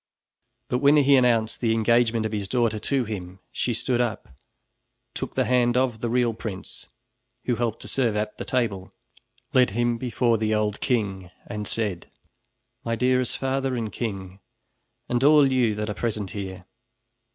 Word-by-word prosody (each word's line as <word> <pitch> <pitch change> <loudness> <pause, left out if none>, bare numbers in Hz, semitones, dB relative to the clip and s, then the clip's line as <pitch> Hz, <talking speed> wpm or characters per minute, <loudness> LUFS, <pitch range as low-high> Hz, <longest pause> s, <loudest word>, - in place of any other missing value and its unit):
But 125 - 0
when 145 +2 +5
he 140 -1 +5
announced 120 -4 +2
the 115 -2 +2
engagement 115 0 +2
of 110 - -2
his 105 -3 -3
daughter 115 -2 +1
to 135 +2 0
him, 95 -4 -6
she 125 - -1
stood 120 +1 0
up, 115 - -3 0.8
took - - -5
the - - +2
hand 125 -1 +2
of 125 -3 +1
the 120 0 -2
real 120 -1 +2
prince, 105 -3 -7 0.6
who 125 - +1
helped 115 -2 -2
to - - -7
serve 120 -5 0
at 105 0 -3
the - - -3
table, 105 -7 -2 0.6
led 125 -1 +5
him 120 -1 +1
before 120 -2 +1
the 110 0 +1
old 105 -1 -1
king 100 -8 -1 0.2
and 105 0 -5
said: 105 -6 -2 0.7
"My 115 0 -1
dearest 125 +1 +1
father 135 0 -1
and 115 -3 -3
king, 95 -4 -5 0.7
and 120 +1 0
all 145 -2 +6
you 120 -5 +2
that 105 0 -3
are 105 - -2
present 105 -3 -3
here! 95 -3 -6
115 Hz, 165 wpm, -25 LUFS, 105-125 Hz, 0.8 s, all